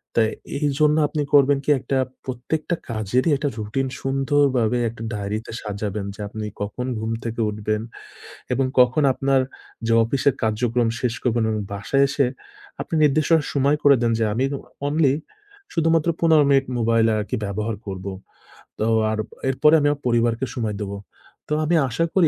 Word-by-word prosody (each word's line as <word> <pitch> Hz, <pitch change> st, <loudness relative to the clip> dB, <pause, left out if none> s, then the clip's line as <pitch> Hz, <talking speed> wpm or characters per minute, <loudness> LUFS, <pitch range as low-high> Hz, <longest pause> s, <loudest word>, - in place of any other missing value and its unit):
তাই 110 Hz, -1 st, +3 dB, 0.3 s
এ -, -, 0 dB
এইজন্য 150 Hz, +1 st, +2 dB
আপনি 150 Hz, +1 st, -2 dB
করবেন 140 Hz, 0 st, +6 dB
কি -, -, -2 dB
একটা 135 Hz, +1 st, -2 dB, 0.3 s
প্রত্যেকটা 140 Hz, +7 st, -2 dB
কাজেরই 115 Hz, -, 0 dB
একটা 145 Hz, +1 st, -1 dB
রুটিন 110 Hz, +5 st, -2 dB
সুন্দর 135 Hz, +2 st, +1 dB
ভাবে 120 Hz, +1 st, +2 dB
একটা 115 Hz, 0 st, -9 dB
ডায়রিতে 105 Hz, +2 st, -4 dB
সাজাবেন 105 Hz, -1 st, -4 dB
যে, -, -, -20 dB
আপনি 110 Hz, +1 st, -6 dB, 0.2 s
কখন 105 Hz, +5 st, -3 dB
ঘুম 110 Hz, +1 st, -3 dB
থেকে 115 Hz, 0 st, -3 dB
উঠবেন। 105 Hz, 0 st, -2 dB, 0.7 s
এবং 135 Hz, -, +1 dB
কখন 125 Hz, +4 st, +4 dB
আপনার 135 Hz, 0 st, +2 dB, 0.5 s
যে, 115 Hz, -, +3 dB
অফিসের 135 Hz, +3 st, +1 dB
কার্যক্রম 115 Hz, +2 st, +1 dB
শেষ 125 Hz, -2 st, 0 dB
করবেন 120 Hz, -2 st, +1 dB
এবং 110 Hz, -1 st, -1 dB
বাসায় 120 Hz, +8 st, +1 dB
এসে 140 Hz, -1 st, +2 dB, 0.5 s
আপনি -, -, -4 dB
নির্দিষ্ট 150 Hz, +2 st, +2 dB, 0.2 s
সময় 140 Hz, +1 st, +2 dB
করে 140 Hz, -1 st, +7 dB
দেন 120 Hz, -1 st, +2 dB
যে, -, -, +2 dB
আমি 120 Hz, +5 st, 0 dB
উ -, -, -9 dB, 0.3 s
অনলি 145 Hz, -2 st, +3 dB, 0.6 s
শুধুমাত্র 165 Hz, -1 st, +2 dB
১৫ 160 Hz, -3 st, +5 dB
মিনিট 135 Hz, -1 st, +4 dB
মোবাইল 115 Hz, -1 st, +3 dB
আরকি 105 Hz, -1 st, -2 dB
ব্যবহার 105 Hz, +3 st, -2 dB
করব। 95 Hz, -1 st, -6 dB, 0.7 s
তো 110 Hz, -, +1 dB, 0.3 s
আর 110 Hz, -, -1 dB, 0.3 s
এরপরে 150 Hz, +4 st, +4 dB
আমি 145 Hz, -, +2 dB
ইয়া 145 Hz, -, 0 dB
পরিবারকে 120 Hz, +1 st, +1 dB
সময় 110 Hz, -4 st, -2 dB
দেবো। 100 Hz, 0 st, -4 dB, 0.5 s
তো -, -, -2 dB
আমি 170 Hz, +3 st, +2 dB
আশা 165 Hz, +8 st, 0 dB
করি 180 Hz, -4 st, +4 dB
125 Hz, 165 wpm, -22 LUFS, 110-145 Hz, 0.7 s, করে